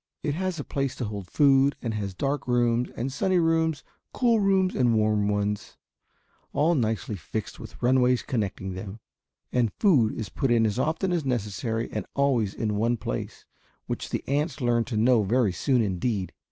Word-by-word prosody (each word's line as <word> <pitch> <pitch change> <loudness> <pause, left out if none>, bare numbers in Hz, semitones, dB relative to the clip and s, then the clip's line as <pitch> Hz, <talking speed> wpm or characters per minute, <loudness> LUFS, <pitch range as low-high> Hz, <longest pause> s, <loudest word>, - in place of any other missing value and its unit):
It 145 - 0
has 185 0 -2
a - - -3
place 135 -2 -2
to 125 - -3
hold 100 -3 -6
food 140 -1 +4
and 115 -2 -3
has 100 -3 -4
dark 140 +6 -2
rooms 120 0 +2
and 130 +3 -3
sunny 185 +5 +1
rooms, 165 -2 +1 0.3
cool 235 -3 +3
rooms 190 -2 +2
and 120 -3 +2
warm 105 -1 +2
ones, 105 0 -2 0.8
all 155 +4 +3
nicely 110 -6 -1
fixed 110 +5 -6
with - - -11
runways 125 0 +3
connecting 100 -7 -3
them, 95 +3 -7 0.5
and 120 -4 +1
food 140 - +3
is 110 - -5
put 135 - -1
in 115 -1 +4
as 105 +2 -1
often 160 +6 0
as 170 -3 0
necessary 115 -2 -2
and - - -4
always 125 -8 +1
in 105 -2 -1
one 115 +3 +1
place, - - -5 0.4
which - - -4
the - - -4
ants 145 +2 -1
learn 120 -2 +1
to 115 -3 -3
know 115 +1 +4
very 105 -1 +2
soon, 125 +4 +1
indeed. 100 0 -2
120 Hz, 180 wpm, -26 LUFS, 105-140 Hz, 0.8 s, food